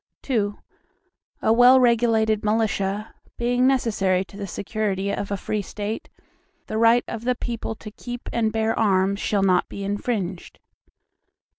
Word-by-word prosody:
II 210 -6 +1 0.9
A 220 - +4
well 245 +2 +7
regulated 225 -3 +3
militia, 210 -1 -1 0.2
being 245 +1 +2
necessary 195 -8 +1
to 195 - -16
the 200 0 -5
security 200 0 -2
of 200 - -3
a 200 - -1
free 210 +2 -2
State, 205 +3 -5 0.6
the 215 - -3
right 230 +1 +5
of 230 -1 -6
the 250 +1 +1
people 230 -2 -4
to 215 -1 -10
keep 245 +3 -8
and 225 -2 +1
bear 220 0 0
arms, 200 -2 +2
shall 205 -2 0
not 185 -2 +2
be 200 - -6
infringed. 200 -3 -3
215 Hz, 145 wpm, -23 LUFS, 200-235 Hz, 0.9 s, well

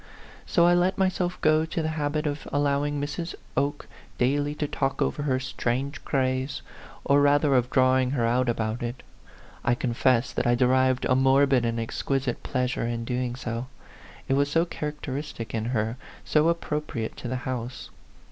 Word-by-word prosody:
So 170 - +4
I 175 - +5
let 180 +2 +2
myself 185 -2 0
go 155 0 +4
to 160 +1 -2
the 155 - 0
habit 150 0 -1
of 145 0 -3
allowing 145 0 +1
Mrs. 145 +4 -4 0.2
Oke 145 +1 -1 0.3
daily 145 +4 +1
to 150 - -2
talk 135 -1 -1
over - - 0
her 135 -3 +1
strange 135 +2 -2
craze, 130 0 -1 0.4
or 140 +1 +4
rather 145 0 +4
of 125 -1 +2
drawing 130 0 +3
her 125 -4 0
out 120 +2 +2
about 115 0 -1
it. 120 +1 -5 0.6
I 120 - +2
confess 125 0 +1
that - - 0
I 120 - +4
derived 130 +1 +3
a 130 - +3
morbid 135 -1 +4
and 115 0 -1
exquisite 130 +2 -2
pleasure 125 -2 -1
in 115 -1 -3
doing 125 0 -2
so: 120 -1 -4 0.6
it - - +1
was 140 +1 +2
so 165 +3 +2
characteristic 150 -6 -5
in 110 -1 -1
her, 115 -1 -1 0.3
so 155 +2 +3
appropriate 150 -8 -2
to - - -6
the 130 - -2
house 125 -1 -5
135 Hz, 165 wpm, -26 LUFS, 125-145 Hz, 0.6 s, I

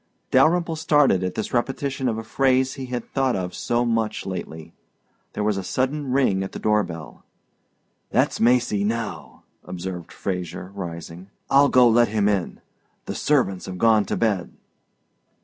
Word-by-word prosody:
Dalyrimple 165 +5 +3
started 145 - +3
at 90 -1 -3
this 110 - -4
repetition 135 +2 -1
of 110 - -2
a 115 - -5
phrase 130 +2 +1
he 130 -2 -7
had 125 -2 -4
thought 135 -2 0
of 90 -1 -3
so 120 +1 0
much 115 -2 -1
lately. 85 -4 -6 0.6
There 105 - -2
was 105 -1 +1
a 95 - -3
sudden 135 +6 -1
ring 125 -8 +2
at 95 - -5
the - - -5
door 105 0 +2
bell. 80 -5 -8 0.9
"That's - - +1
Macy 120 -3 +2
now," 105 -7 -4 0.2
observed 90 -1 -6
Fraser, 90 -1 -5
rising. 85 -1 -7 0.2
"I'll 140 +1 +6
go 125 -1 +6
let 120 +1 +4
him 105 -1 +1
in. 100 -4 -1 0.4
The - - -4
servants 125 -11 0
have 95 -1 -6
gone 110 +1 +4
to - - -2
bed." 105 -6 0
110 Hz, 160 wpm, -23 LUFS, 95-130 Hz, 0.9 s, I'll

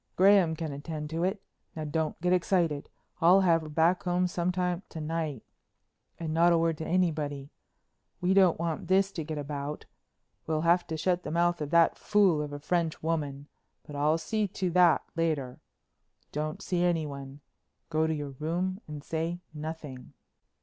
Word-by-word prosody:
Graham 190 -4 +5
can 160 -2 -4
attend 150 +1 -6
to 165 +1 -1
it. 195 +2 -1 0.3
Now 155 - -4
don't 155 +1 -2
get 180 +1 +2
excited, 170 -5 +1 0.3
I'll 180 +4 +6
have 170 -3 +4
her 155 - -8
back 165 +4 +2
some 180 0 0
time 180 -1 -1
to 160 - -7
night. 155 -5 -3 0.8
And 160 -2 -3
not 170 +2 +5
a 170 - +4
word 165 -1 +1
to 160 - -4
anybody. 150 -6 -1 0.7
We 180 +1 +2
don't 190 -3 +5
want 165 -1 -3
this 195 +1 +3
to 165 - -4
get 155 0 -5
about. 145 0 -5 0.6
We'll 155 -1 0
have 170 +2 +3
to 160 - -3
shut 180 +2 +1
the - - -6
mouth 175 +1 +1
of 150 - -3
that 170 0 +4
fool 195 -7 +3
of 150 -1 -4
a 145 - -5
French 165 +2 -1
woman, 145 -3 -2 0.4
but 150 - -9
I'll 150 +3 +2
see 215 +5 -1
to 185 -1 -2
that 175 -1 +5
later. 155 -6 -1 0.7
Don't 155 +6 -3
see 175 -1 0
anyone. 145 -5 -2 0.5
Go 160 0 +2
to 160 - 0
your 145 -2 -5
room 180 +5 -2
and 150 -2 -7
say 165 +3 -2
nothing." 150 -4 -7
165 Hz, 170 wpm, -29 LUFS, 150-180 Hz, 0.8 s, I'll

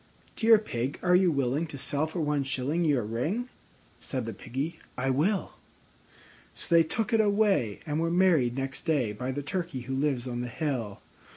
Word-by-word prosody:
"Dear 225 -1 +6
Pig, 135 - -3
are 180 0 +4
you 180 -1 +4
willing 140 +3 0
to 150 - -8
sell 145 +3 0
for 165 +2 -4
one 150 -1 +1
shilling 135 +5 -1
Your 145 -7 +2
ring?" 155 - -2 0.5
Said 130 -4 -4
the 115 - -4
Piggy, 135 - -4 0.2
"I 135 +1 +1
will." 180 +10 +1 1.0
So - - -4
they 165 - +8
took 220 +8 -1
it 225 - +5
away, 200 - +2
and 150 -1 -1
were 165 0 +1
married 165 -9 +3
next 135 0 -3
day 140 -9 +1
By 125 +5 -3
the 145 +2 -4
Turkey 165 -3 -3
who 130 +2 -5
lives 135 -2 0
on 120 -1 -3
the 125 - -3
hill. 125 -6 -3
145 Hz, 185 wpm, -28 LUFS, 125-175 Hz, 1.0 s, they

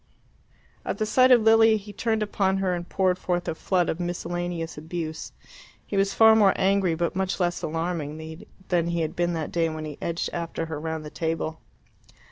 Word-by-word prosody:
At - - -3
the 215 - 0
sight 255 +4 +4
of 245 -3 +6
Lilia 225 0 +6
he 205 0 -10
turned 220 +1 0
upon 195 -2 0
her 190 -2 0
and 175 0 -5
poured 185 -1 +1
forth 175 -1 -2
a - - 0
flood 180 +2 0
of 160 - -2
miscellaneous 175 -1 -3
abuse. 160 0 -5 0.5
He - - -5
was 195 0 +2
far 220 0 +7
more 205 -3 +5
angry 190 -3 +2
but 170 +2 -1
much 190 0 -1
less 175 -1 0
alarming 160 -1 -4 0.3
than 170 -2 +2
he 170 0 -1
had 160 -1 -3
been 175 0 0
that 160 -2 -3
day 165 -1 +1
when 155 0 -5
he 150 -2 -8
edged 170 0 -2
after 165 -1 -3
her 160 -2 -5
round 160 0 -4
the 150 - -8
table. 160 -1 -3
175 Hz, 195 wpm, -25 LUFS, 160-195 Hz, 0.5 s, far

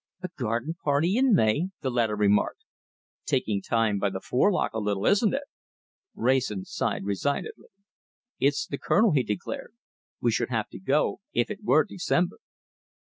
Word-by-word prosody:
"A 185 - -3
garden 120 +5 -2
party 155 +6 +2
in 255 -3 +4
May!" 145 +6 +2
the 130 - -1
latter 115 -3 +1
remarked. 105 0 +1 0.6
"Taking 110 -8 0
time 110 -1 +1
by 100 - +1
the 95 - -5
forelock 180 - +1
a 110 - -2
little, 105 -1 -1
isn't 210 +4 +3
it?" 280 - -2 0.7
Wrayson 120 -6 0
sighed - - -2
resignedly. 100 +8 -2 0.7
"It's 140 +1 +2
the 140 - -5
Colonel!" 220 -1 +3
he 145 -4 +3
declared. 170 - -5 0.4
"We - - +2
should - - 0
have - - -1
to - - -10
go - - +1
if - - +1
it 210 0 -6
were 155 -6 +4
December!" 175 -1 -1
130 Hz, 155 wpm, -27 LUFS, 105-180 Hz, 0.7 s, in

